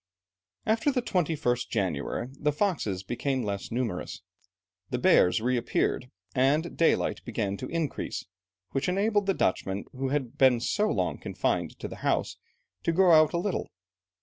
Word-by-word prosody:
After 225 +6 +2
the 250 -3 -1
21st 150 - 0
January, 95 - -2
the 150 - +2
foxes 145 - -1
became 130 +5 -1
less 100 -2 -3
numerous, 115 -6 -3 0.7
the - - -1
bears 90 +5 +4
reappeared, 125 +1 0 0.2
and 145 +6 +2
daylight 165 - +2
began 105 -4 -2
to 130 - -5
increase, 165 -4 -3 0.5
which 135 - 0
enabled 205 +2 +1
the 195 - +2
Dutchmen, 95 +2 0
who 135 0 -3
had 135 -4 -2
been 130 -3 +6
so 210 - +1
long - - -1
confined - - -1
to - - -5
the - - -9
house, - - 0 0.4
to 170 - +1
go 180 +1 +5
out 155 -2 +6
a - - +1
little. 185 +2 -1
135 Hz, 150 wpm, -28 LUFS, 115-170 Hz, 0.7 s, been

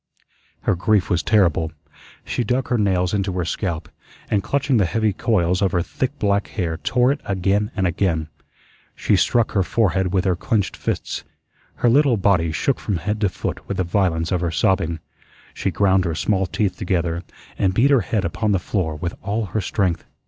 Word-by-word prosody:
Her - - +1
grief 100 +2 +1
was 85 -2 +2
terrible. 85 -4 +2 0.5
She 120 - -1
dug 125 +3 -1
her 120 - +2
nails 95 -3 +1
into 100 -2 0
her 90 -2 -1
scalp, 85 -2 -3 0.4
and 100 - +2
clutching 140 +4 +1
the 100 -5 +3
heavy 110 +2 +1
coils 95 -6 +1
of 95 -2 +1
her 85 - +2
thick 130 +10 -3
black 100 -1 +1
hair 85 -6 -3
tore 125 +8 +2
it 145 - -3
again 100 +2 0
and 95 -3 0
again. 85 -3 0 0.7
She - - +1
struck 120 -2 +2
her 100 - +2
forehead 95 -2 +1
with 95 0 +1
her 95 -2 +2
clenched 105 +2 -1
fists. - - -3 0.5
Her - - +1
little 140 -2 +4
body 90 -5 +2
shook 130 - 0
from 100 -4 -2
head 105 +6 -3
to 100 - +3
foot - - -5
with - - -3
the 95 - +1
violence 85 -3 0
of 90 -2 +1
her 85 - 0
sobbing. 85 -2 0 0.5
She - - -2
ground 95 -2 +2
her 85 -2 -1
small 95 +3 0
teeth 100 +2 -1
together 85 -3 -1 0.4
and 95 - +3
beat 135 +6 +4
her 135 -4 +5
head 105 -3 -1
upon 110 -2 0
the - - +3
floor 90 -4 -2
with 85 +3 -4
all 105 +2 -1
her 110 - +1
strength. 95 -5 -1
95 Hz, 190 wpm, -21 LUFS, 85-110 Hz, 0.7 s, her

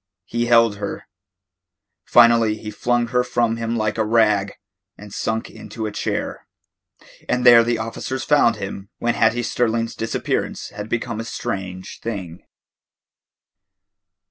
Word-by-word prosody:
He 120 +4 -2
held 115 -3 +4
her. 100 -1 -6 1.0
Finally 115 -2 +5
he 105 0 -7
flung 120 +2 0
her 125 0 +2
from 120 -2 0
him 115 0 -2
like 110 0 -1
a - - +3
rag, 105 -3 +2 0.4
and 105 -1 -12
sank 110 0 -2
into 110 -2 -7
a 105 - -3
chair. - - -3 0.8
And 125 0 0
there 120 -1 +9
the 120 0 0
officers 115 +4 -4
found 145 -6 +4
him 100 -1 -7
when 120 0 0
Hattie 115 +1 +2
Sterling's 115 -1 0
disappearance 115 0 -3
had 105 +1 -8
become 120 -1 -2
a - - -3
strange 95 -4 -5
thing. 95 -7 -6
115 Hz, 135 wpm, -21 LUFS, 105-120 Hz, 1.0 s, there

